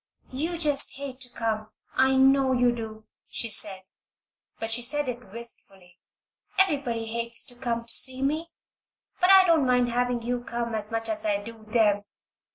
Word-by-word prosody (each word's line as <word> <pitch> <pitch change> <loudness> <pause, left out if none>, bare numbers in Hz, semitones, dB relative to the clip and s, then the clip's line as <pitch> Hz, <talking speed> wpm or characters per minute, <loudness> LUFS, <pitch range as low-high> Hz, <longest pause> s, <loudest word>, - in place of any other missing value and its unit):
"You 320 +7 -3
just 295 -4 +2
hate 275 -2 -7
to 255 -2 -1
come 215 -2 -3 0.3
I 265 0 +3
know 265 0 +4
you 245 -1 +3
do!" 220 -2 -8 0.2
she 230 - -2
said, 195 -2 +5 0.8
but 225 0 -3
she 235 +2 +4
said 290 +4 +2
it 245 -5 -7
wistfully. 195 -6 -5 0.6
"Everybody 280 -11 +1
hates 235 +1 -1
to 245 - -11
come 235 -2 -3
to 235 - 0
see 260 0 +4
me. 310 +4 -1 0.7
But 360 - +3
I 385 -1 +8
don't 325 -6 +3
mind 250 -1 +2
having 245 0 -1
you 245 +1 -3
come 235 -1 -4
as 215 0 -2
much 225 0 -2
as 220 -1 -2
I 205 -2 0
do 220 +2 -11
them. 215 -2 +2
240 Hz, 170 wpm, -26 LUFS, 225-265 Hz, 0.8 s, I